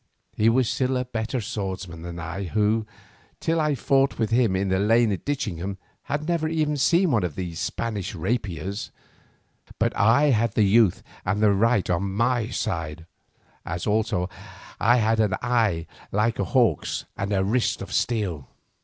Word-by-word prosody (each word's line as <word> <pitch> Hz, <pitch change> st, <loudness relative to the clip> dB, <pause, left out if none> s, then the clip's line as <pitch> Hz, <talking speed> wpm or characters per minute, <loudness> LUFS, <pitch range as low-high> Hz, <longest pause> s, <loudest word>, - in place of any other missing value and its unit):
He 110 Hz, +1 st, +4 dB
was 125 Hz, +1 st, +3 dB
still 130 Hz, +1 st, 0 dB
a 125 Hz, -, -1 dB
better 115 Hz, +1 st, -3 dB
swordsman 95 Hz, -5 st, -5 dB
than 85 Hz, 0 st, -7 dB
I, 85 Hz, +3 st, -5 dB
who, 110 Hz, +3 st, +1 dB, 0.5 s
till 165 Hz, 0 st, +1 dB
I 150 Hz, -2 st, +1 dB
fought 135 Hz, +3 st, +2 dB
with 115 Hz, -1 st, -1 dB
him 115 Hz, -5 st, +3 dB
in 95 Hz, +1 st, 0 dB
the 95 Hz, 0 st, +1 dB
lane 115 Hz, +2 st, +3 dB
at 95 Hz, -, -4 dB
Ditchingham, 100 Hz, -, -3 dB, 0.3 s
had 150 Hz, +2 st, -3 dB
never 170 Hz, -2 st, 0 dB
even 155 Hz, -2 st, 0 dB
seen 170 Hz, +5 st, +3 dB
one 110 Hz, -6 st, +2 dB
of 85 Hz, -5 st, -3 dB
these 85 Hz, -3 st, -5 dB
Spanish 105 Hz, -5 st, -3 dB
rapiers, 95 Hz, 0 st, -3 dB, 0.9 s
but -, -, 0 dB
I 130 Hz, +8 st, +4 dB
had 115 Hz, -2 st, +1 dB
the 110 Hz, -, +3 dB
youth 105 Hz, -1 st, +4 dB, 0.2 s
and 105 Hz, -, 0 dB
the 105 Hz, -1 st, +4 dB
right 110 Hz, +1 st, +2 dB
on 95 Hz, +2 st, -1 dB
my 115 Hz, +1 st, +1 dB
side, 80 Hz, -1 st, -3 dB, 0.6 s
as 85 Hz, 0 st, -4 dB
also 105 Hz, -4 st, +1 dB, 0.5 s
I 120 Hz, +4 st, +4 dB
had 110 Hz, -1 st, +2 dB
an 105 Hz, -2 st, +2 dB
eye 110 Hz, -9 st, +1 dB, 0.3 s
like 110 Hz, +3 st, +1 dB
a -, -, +1 dB
hawk's 120 Hz, -, +1 dB
and 100 Hz, +1 st, -3 dB
a 95 Hz, -2 st, +2 dB
wrist 115 Hz, +5 st, +1 dB
of -, -, -8 dB
steel. 100 Hz, -, -1 dB
110 Hz, 170 wpm, -25 LUFS, 95-125 Hz, 0.9 s, He